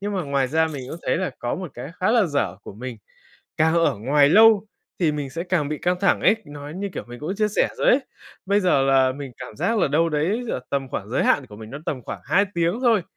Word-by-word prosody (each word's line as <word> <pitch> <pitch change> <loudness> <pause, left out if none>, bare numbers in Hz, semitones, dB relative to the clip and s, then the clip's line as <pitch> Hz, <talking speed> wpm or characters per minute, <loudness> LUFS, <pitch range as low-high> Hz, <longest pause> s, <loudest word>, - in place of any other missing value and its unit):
Nhưng 205 +1 -3
mà 185 - -1
ngoài 140 -3 0
ra 160 +3 +2
mình 145 -4 -6
cũng 165 - -6
thấy - - +2
là 185 -2 -1
có 120 - -2
một 180 -4 -6
cái 125 +5 -7
khá 185 - +2
là 225 -5 +4
dở 115 - -1
của - - -9
mình, 125 +2 -7 0.6
càng 160 +1 +3
ở 165 -8 +2
ngoài 140 +5 +4
lâu 220 +2 +6 0.3
thì 160 -4 +3
mình 145 -2 -4
sẽ 165 +5 -4
càng 175 -6 0
bị 150 0 -3
căng 180 0 0
thẳng 195 - +3
ấy, 205 - +4
nói 145 +1 -9
như, 200 +2 -3
kiểu, - - -5
mình 120 +2 -10
cũng 170 +6 -3
chia 215 0 +2
sẻ 210 - +1
rồi - - 0
ấy. 265 - +5 0.5
Bây 200 +2 +3
giờ 180 -8 +3
là 135 -1 +3
mình 135 -1 -8
cảm 105 - -9
giác 225 - 0
là 175 - +2
đâu 160 +4 +2
đấy 165 +10 0
giữa 175 - -2
tầm 135 -1 -1
khoảng 105 -6 -5
giới 130 - +1
hạn 140 - +2
của 105 -3 -12
mình 110 0 -10
nó 140 - -6
tầm 130 -4 -3
khoảng - - -7
2 200 +2 +3
tiếng 170 +5 +1
thôi, 230 -6 +4
155 Hz, 270 wpm, -23 LUFS, 135-185 Hz, 0.6 s, lâu